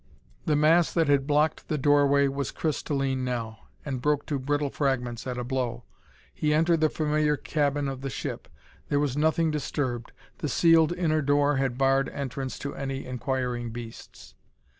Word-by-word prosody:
The 150 - +3
mass 160 +3 +4
that 165 -3 +2
had 140 -1 +2
blocked 150 +1 +1
the 155 - -1
doorway 140 0 +4
was 140 -1 -2
crystalline 135 -4 -1
now, 115 -3 -4 0.2
and 130 -4 -3
broke 150 0 +1
to 145 -2 -2
brittle 145 +1 -1
fragments 125 -4 -1
at 125 -1 -3
a 125 - -2
blow. 125 -1 -2 0.5
He 150 0 +1
entered 165 +1 +3
the 155 - +4
familiar 150 -1 +1
cabin 145 -1 0
of 135 -1 -5
the 135 - -3
ship. 115 - -5 0.4
There 145 - +2
was 145 -3 0
nothing 160 +2 +2
disturbed; 130 -5 -3 0.3
the 150 - -2
sealed 165 +2 +4
inner 160 -3 +1
door 145 0 +2
had 130 -2 -1
barred 135 0 +2
entrance 135 -1 -5
to 140 - -3
any 135 -1 -4
inquiring 125 -1 -2
beasts. 115 0 -10
140 Hz, 165 wpm, -27 LUFS, 130-150 Hz, 0.5 s, mass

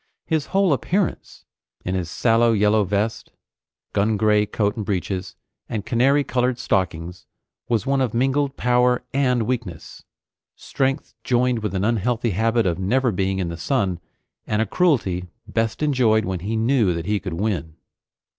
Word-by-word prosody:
His 160 -3 -1
whole 195 -4 +2
appearance, 180 - -2 0.4
in 90 - -1
his 90 -3 -2
sallow 115 +3 +3
yellow 105 0 +3
vest, 105 +4 -2 0.6
gun 105 +2 +1
gray 105 0 +3
coat 105 -1 0
and 110 - -3
breeches 95 -1 -3 0.3
and 105 -3 -3
canary 135 +4 +3
colored 125 -2 0
stockings, 90 -7 -2 0.4
was 115 -4 +1
one 135 0 +1
of 125 -4 0
mingled 135 +4 0
power 125 0 +2
and 125 -4 +2
weakness; 110 -9 -5 0.5
strength 135 0 -2
joined 125 -1 +1
with 105 -3 -3
an 95 +1 0
unhealthy 115 +1 0
habit 115 +4 +1
of 90 -1 0
never 120 +6 +1
being 95 0 -1
in 90 -3 -2
the 85 - -6
sun, 95 - -1 0.5
and 105 - 0
a 110 - +2
cruelty 100 - +1 0.2
best 115 +5 -1
enjoyed 120 -7 +3
when 95 -1 -3
he 105 +6 -3
knew 110 -5 +2
that 85 -1 -4
he 105 +1 0
could 95 -4 -5
win. 85 -5 -2
110 Hz, 155 wpm, -22 LUFS, 95-125 Hz, 0.6 s, sallow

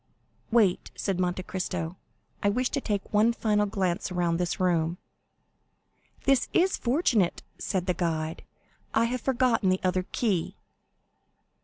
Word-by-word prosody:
"Wait," 220 -6 +3
said 195 -3 -2
Monte 180 0 0
Cristo, 180 -2 -3 0.5
"I 205 - +3
wish 250 +4 0
to 280 - -1
take 205 -4 -3
one 215 +3 +5
final 210 -2 +1
glance 190 -1 -1
around 175 -2 +1
this 175 -1 -1
room." 170 -2 +1 1.3
"This 270 -2 +3
is 370 +2 +3
fortunate," 240 - +1 0.2
said 185 -4 -1
the 180 - +1
guide; 160 -2 -2 0.5
"I 225 - +4
have 245 +1 -2
forgotten 245 -6 +2
the 185 0 +2
other 185 0 0
key." 200 -9 0
190 Hz, 135 wpm, -27 LUFS, 180-230 Hz, 1.3 s, one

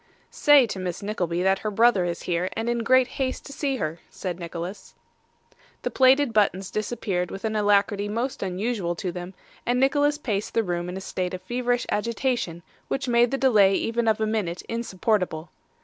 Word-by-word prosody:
'Say 290 -4 +6
to 200 -4 -5
Miss 180 0 -4
Nickleby 180 -4 -1
that 190 0 +3
her 215 - -2
brother 210 -3 +4
is 170 -1 -3
here, 175 +1 -1
and 225 +1 -3
in 240 0 0
great 255 +2 +4
haste 260 +1 -3
to 280 - -9
see 275 -1 -1
her,' 160 -7 -3
said 180 -2 -5
Nicholas. 175 +3 -7 0.9
The - - -1
plated 265 -1 +4
buttons 195 -3 +1
disappeared 210 -5 -2
with 195 - -6
an 220 0 -1
alacrity 205 0 +2
most 235 +5 -2
unusual 190 -1 -2
to 180 +2 -3
them, 180 +1 -7 0.3
and 245 +1 +1
Nicholas 290 +2 +3
paced 210 -8 -3
the 230 - +3
room 175 -2 -2
in 180 - -5
a - - -6
state 185 -1 -3
of 185 - -8
feverish 245 +3 -1
agitation 235 -6 -1 0.2
which 270 - -2
made 240 0 +4
the 270 - -1
delay 210 -8 +5
even 230 +2 0
of 220 -1 +3
a 220 - +1
minute 210 -6 -2
insupportable. 190 -7 -2
210 Hz, 185 wpm, -25 LUFS, 180-240 Hz, 0.9 s, Say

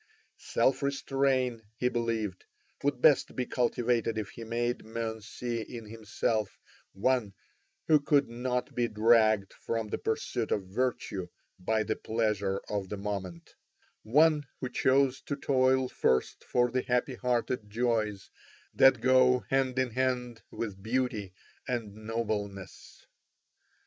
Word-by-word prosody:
Self 130 - +1
restrain, 135 -3 0 0.2
he 125 - +1
believed, 115 -5 -2 0.4
would 135 -3 -1
best 145 -4 +5
be 125 - -1
cultivated 120 -2 0
if 105 -2 -3
he 115 - -9
made 120 +2 -2
men 110 0 -4
see 120 +2 -4
in 115 +1 -8
himself 110 -1 -2 0.4
one 105 -1 0 0.5
who 155 -1 +6
could 145 -1 +3
not 125 +1 -3
be 120 -1 +1
dragged 110 -2 +3
from 115 -2 -3
the - - -3
pursuit - - -2
of 100 - +1
virtue 100 -3 -2 0.3
by 110 +4 +1
the 110 +1 -1
pleasure 105 -3 -1
of 100 -2 -3
the 105 - -4
moment, 100 -4 -5 0.5
one 150 +4 +3
who 125 - -3
chose 130 +1 +2
to 140 - -4
toil 130 -2 +2
first 65 - 0
for 125 -1 +2
the 130 +1 +1
happy 125 +2 0
hearted 125 -3 -1
joys 110 -3 -1 0.4
that 135 -3 +5
go 130 0 +5
hand 135 -1 +1
in 130 -2 +1
hand 125 -1 -1
with 100 -4 -5
beauty 110 -3 -1 0.4
and 115 -5 -3
nobleness. 110 -3 -5
115 Hz, 130 wpm, -30 LUFS, 110-130 Hz, 0.5 s, who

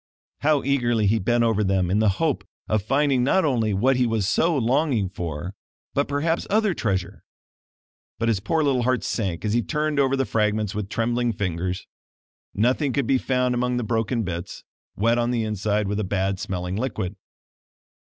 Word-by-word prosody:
How 150 -1 +2
eagerly 120 -5 +1
he 110 +3 +3
bent 120 +4 +2
over 110 -2 +2
them 95 -2 +1
in 105 - +2
the 110 -1 +4
hope 155 -5 0 0.2
of 110 -1 +1
finding 135 +3 +2
not 190 +8 +3
only 115 -7 +1
what 125 +7 +2
he 125 -1 +2
was 110 -4 0
so 165 +8 +2
longing 125 - +1
for 85 0 -5 0.4
but, 140 - +1
perhaps, 155 +4 -1
other 210 -1 +2
treasure! 95 - -2 0.9
But 115 +1 -1
his 110 -4 +2
poor 155 +10 0
little 135 -4 +2
heart 130 0 +1
sank 95 -4 -2
as 105 - 0
he 120 - +3
turned 150 +2 -1
over 135 -1 +3
the 135 0 0
fragments 105 -2 0
with 105 -1 -4
trembling 120 +1 0
fingers. 90 -2 -3 0.7
Nothing 125 +6 +1
could 140 0 0
be 130 +2 +2
found 125 -1 +1
among 125 0 0
the 120 - -1
broken 115 +1 0
bits, 85 -3 -5 0.3
wet 115 +3 +2
on 120 0 +1
the 120 -2 0
inside 105 -1 -1
with 105 +1 -1
a - - 0
bad 95 0 -1
smelling 90 0 -3
liquid. 105 -6 -3
115 Hz, 185 wpm, -24 LUFS, 100-130 Hz, 0.9 s, the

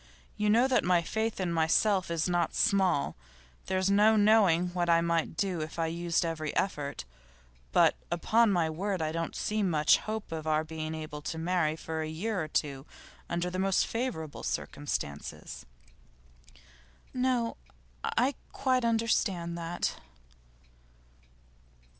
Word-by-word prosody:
You 210 0 0
know 235 +5 +5
that 260 - +2
my 175 -1 +3
faith 220 +4 -2
in 180 -3 -1
myself 180 +4 +2
is 165 -1 0
not 175 -2 0
small; 190 -8 +2 0.5
there's 190 +1 +1
no 210 +2 +5
knowing 205 -5 +4
what 175 -1 -1
I 165 0 +5
might 170 -1 0
do 185 -5 -1
if 155 +2 -6
I 165 - +1
used 170 +1 0
every 155 -2 -3
effort. 145 -7 -2 0.7
But, - - +4
upon 215 +6 +3
my 175 -4 +2
word, 185 +5 -2
I 155 -1 -1
don't 165 0 -3
see 215 0 -1
much 160 -6 +4
hope 215 -3 -5
of 160 -1 -5
our 155 0 +2
being 160 0 -5
able 155 -1 -6
to 155 +2 -5
marry 165 -2 0
for 160 0 -4
a 155 - -3
year 185 +3 -2
or - - -5
two 140 -2 -2 0.4
under 175 +1 -1
the 185 - -3
most 195 0 +2
favourable 225 - -4
circumstances.' 75 - -4 1.5
'No; 250 -2 0 0.5
I 265 +3 +1 0.2
quite 255 -2 +1
understand 220 -7 +1
that. 170 +1 -2
175 Hz, 140 wpm, -30 LUFS, 160-210 Hz, 1.5 s, know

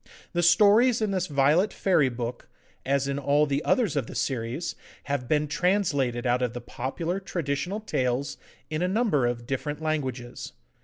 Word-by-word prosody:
The 175 - +1
stories 215 +7 +5
in 215 -2 0
this 185 -2 -1
Violet 150 +8 +3
Fairy 160 -8 +2
Book, 120 0 -5 0.4
as 140 0 +1
in 140 0 -1
all 145 +2 +3
the 140 0 -1
others 220 - +2
of 135 -5 -1
the - - -9
series, 125 +5 -2 0.3
have 140 -3 -3
been 150 +1 +1
translated 145 -9 0
out 125 0 +2
of 125 -2 -1
the 120 - -5
popular 160 +10 -4
traditional 175 +1 -3
tales 130 - -1 0.3
in 155 +1 -1
a 180 - +2
number 190 - +2
of 120 -1 -3
different 145 +4 -3
languages. 130 -6 -3
145 Hz, 165 wpm, -26 LUFS, 130-180 Hz, 0.4 s, stories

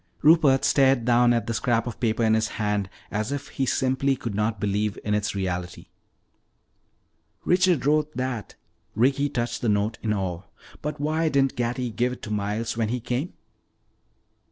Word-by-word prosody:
Rupert 150 -4 +5
stared 135 -4 +3
down 120 0 +4
at 115 -3 +1
the 115 - -2
scrap 115 -1 +1
of 120 - -6
paper 115 -1 0
in 110 -1 +3
his 110 0 +2
hand 105 -2 -1 0.2
as 110 +4 -2
if 145 0 -4
he 135 -2 -2
simply 130 +2 +1
could 115 -4 -5
not 105 +1 -1
believe 105 +1 -1
in 105 - -1
its 105 0 -1
reality. 90 -2 -4 1.6
"Richard 180 -5 +3
wrote 150 0 +1
that." 125 -4 -3 0.4
Ricky 135 +5 +2
touched 120 -3 -3
the 120 - +1
note 105 +2 0
in 110 - -1
awe. 95 -4 -2 0.4
"But 150 0 -4
why 155 +2 +1
didn't 135 -2 +2
Gatty 120 0 -2
give 120 +4 0
it - - -11
to 105 - -6
Miles 105 +3 -2
when 115 -2 0
he 125 +2 -1
came?" 125 +8 -3
120 Hz, 170 wpm, -25 LUFS, 105-135 Hz, 1.6 s, Rupert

